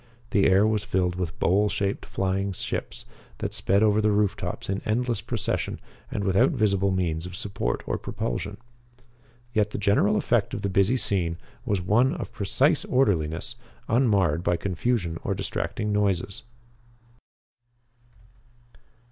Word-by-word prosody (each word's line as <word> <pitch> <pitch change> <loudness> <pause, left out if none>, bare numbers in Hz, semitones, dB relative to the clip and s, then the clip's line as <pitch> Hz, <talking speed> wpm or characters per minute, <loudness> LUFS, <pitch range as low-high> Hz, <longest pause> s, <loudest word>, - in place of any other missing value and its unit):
The 100 - +4
air 95 +2 +5
was 110 -1 +1
filled 90 -3 0
with 90 -2 -4
bowl 100 +4 +3
shaped 100 -1 -2
flying 95 +1 -1
ships - - -4 0.3
that - - -3
sped 100 +3 +2
over 105 0 +4
the 105 - +3
roof 105 -1 +2
tops - - -5
in 95 +1 -2
endless 115 0 0
procession 115 -1 -2 0.3
and 100 - -3
without 95 0 +4
visible 100 -2 +1
means 90 -3 -1
of 90 - -8
support 95 -11 -3
or - - -2
propulsion. 100 +11 -4 1.0
Yet 105 -2 +2
the - - -5
general 100 0 +3
effect - - +1
of - - -5
the 100 - 0
busy 100 +6 +3
scene 85 -8 +1 0.3
was 100 -5 +1
one 110 +8 +3
of 105 - -6
precise 135 - +2
orderliness, 80 - +1 0.3
unmarred 100 - +2
by 85 - +1
confusion 90 -2 -1
or - - -1
distracting 105 0 -2
noises. 100 -2 0
100 Hz, 140 wpm, -26 LUFS, 90-105 Hz, 1.0 s, air